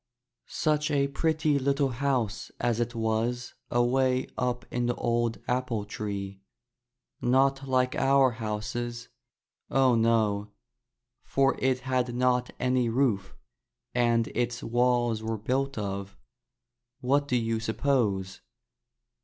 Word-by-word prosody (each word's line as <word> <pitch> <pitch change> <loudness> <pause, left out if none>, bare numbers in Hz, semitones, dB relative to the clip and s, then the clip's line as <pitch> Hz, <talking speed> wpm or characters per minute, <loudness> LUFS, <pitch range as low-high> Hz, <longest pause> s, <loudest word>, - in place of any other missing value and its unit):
Such 155 0 0
a 140 -2 +2
pretty 155 0 +1
little 140 +1 +1
house 125 -4 -1
as 120 -1 0
it 120 +1 -2
was 115 +2 -1 0.2
away 130 +1 +2
up 125 -1 -1
in 120 0 0
the 120 - 0
old 120 -1 0
apple 125 -4 -1
tree. 100 -2 -5 0.8
Not 135 +2 +2
like 130 -1 +2
our 135 -1 +4
houses, 115 +2 -4 0.6
oh, 135 -2 +4
no! 110 -3 +2 0.4
— - - -56
for 135 0 +3
it 130 -1 +1
had 125 -2 -1
not 125 0 +2
any 125 -1 +1
roof 115 -6 0 0.6
and 120 -1 +2
its 120 0 -2
walls 120 -1 +1
were 110 0 -2
built 135 +5 -1
of 100 -1 -4 0.4
— 120 +1 -40
^what 140 +3 +2
do 125 - 0
you 115 -1 0
suppose? 110 -6 0
120 Hz, 120 wpm, -28 LUFS, 115-130 Hz, 0.8 s, our